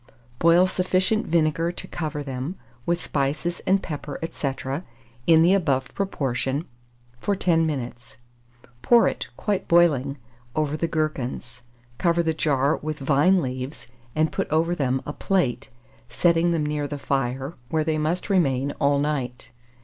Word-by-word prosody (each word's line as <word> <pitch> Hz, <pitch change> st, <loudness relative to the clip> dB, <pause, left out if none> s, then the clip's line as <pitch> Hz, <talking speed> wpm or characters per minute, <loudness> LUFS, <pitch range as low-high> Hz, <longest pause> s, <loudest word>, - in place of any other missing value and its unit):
Boil 170 Hz, +2 st, +6 dB
sufficient 185 Hz, +3 st, +1 dB
vinegar 165 Hz, +1 st, +2 dB
to 175 Hz, -, -6 dB
cover 150 Hz, -3 st, -4 dB
them, 135 Hz, +5 st, -4 dB, 0.3 s
with 170 Hz, +1 st, 0 dB
spices 150 Hz, +5 st, -1 dB
and 195 Hz, 0 st, +3 dB
pepper, 145 Hz, -3 st, -5 dB
&c., 140 Hz, -, -2 dB, 0.8 s
in 160 Hz, -1 st, +7 dB
the 180 Hz, +3 st, +5 dB
above 140 Hz, -9 st, +1 dB
proportion, 140 Hz, -6 st, -1 dB, 0.5 s
for 200 Hz, +10 st, 0 dB
10 165 Hz, -4 st, +2 dB
minutes; 125 Hz, -4 st, -5 dB, 0.6 s
pour 240 Hz, -1 st, +5 dB
it, -, -, -3 dB
quite 205 Hz, -3 st, -1 dB
boiling, 145 Hz, -5 st, +3 dB, 0.4 s
over 155 Hz, -1 st, 0 dB
the 165 Hz, +2 st, -1 dB
gherkins, 130 Hz, -6 st, -3 dB, 0.4 s
cover 170 Hz, -1 st, +2 dB
the 160 Hz, -1 st, +1 dB
jar 145 Hz, -2 st, +1 dB
with 155 Hz, 0 st, -4 dB
vine 150 Hz, +6 st, +3 dB
leaves, 130 Hz, +2 st, -5 dB, 0.3 s
and 155 Hz, 0 st, +2 dB
put -, -, -2 dB
over 165 Hz, +3 st, +2 dB
them 130 Hz, -5 st, 0 dB
a 145 Hz, -, -4 dB
plate, 135 Hz, -11 st, 0 dB, 0.4 s
setting 170 Hz, +6 st, +3 dB
them 160 Hz, -3 st, 0 dB
near 150 Hz, -1 st, -1 dB
the 145 Hz, -, -5 dB
fire, 135 Hz, +1 st, -2 dB, 0.2 s
where 160 Hz, -1 st, +1 dB
they 155 Hz, 0 st, 0 dB
must 160 Hz, +4 st, -1 dB
remain 140 Hz, -8 st, +2 dB
all 140 Hz, -1 st, +3 dB
night. 135 Hz, -4 st, -2 dB
155 Hz, 145 wpm, -24 LUFS, 135-170 Hz, 0.8 s, in